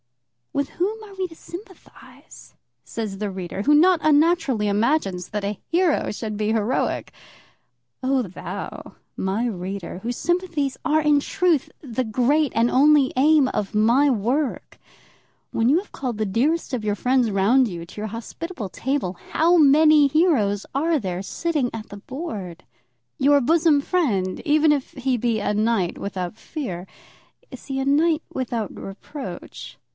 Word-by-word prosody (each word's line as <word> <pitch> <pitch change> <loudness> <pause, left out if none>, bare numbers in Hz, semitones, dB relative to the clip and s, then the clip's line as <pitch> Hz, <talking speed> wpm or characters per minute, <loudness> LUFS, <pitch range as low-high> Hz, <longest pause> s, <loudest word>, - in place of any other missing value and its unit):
With 280 0 -1
whom 420 +5 -2
are 410 -2 -12
we 380 -1 -3
to 325 - -14
sympathise? 380 +4 -13 0.3
says 210 -4 -5
the 210 -1 -2
reader, 190 0 -5
who 290 +8 +3
not 345 +3 +5
unnaturally 295 -7 +3
imagines 205 - 0
that 210 -1 -3
a 205 0 -3
hero 340 -2 +1
should 215 0 -5
be 210 +1 -1
heroic. 225 +3 -1 0.9
Oh, 260 0 +2
thou, 185 -4 -7 0.2
my 195 +5 -1
reader, 190 -3 -5
whose 240 +4 -4
sympathies 345 -6 -1
are 310 +1 +2
in 295 -1 +4
truth 350 -1 +1
the 255 -3 -3
great 255 +5 +1
and 235 +1 +2
only 285 +1 +4
aim 290 +1 +4
of 210 -4 -3
my 235 +7 +4
work, 255 +4 -1 0.7
when 230 +1 +1
you 295 - +5
have 395 +3 -5
called 250 -5 -4
the 215 - 0
dearest 275 - 0
of 240 -4 -2
your 210 -1 0
friends 250 +1 +2
round 225 +7 +3
you 170 -4 -6
to 210 - -9
your 215 - -3
hospitable 230 - -6
table, 260 -5 -2 0.2
how 335 +3 +4
many 305 -1 +6
heroes 270 - +2
are 315 +3 +1
there 185 -5 -3
sitting 295 - -1
at 225 -1 -7
the 205 - -9
board? 205 - -7 0.5
Your 285 +1 +5
bosom 310 +2 +3
friend, 220 - 0
even 305 +1 +4
if 280 -3 -3
he 260 -1 -1
be 230 -1 0
a 210 - -1
knight 215 -4 0
without 185 -2 -4
fear, 195 - -6 0.6
is - - -11
he 270 -1 -2
a 265 - -1
knight 310 +3 +2
without 235 -4 -3
reproach? 260 +8 -8
260 Hz, 155 wpm, -23 LUFS, 210-305 Hz, 0.9 s, many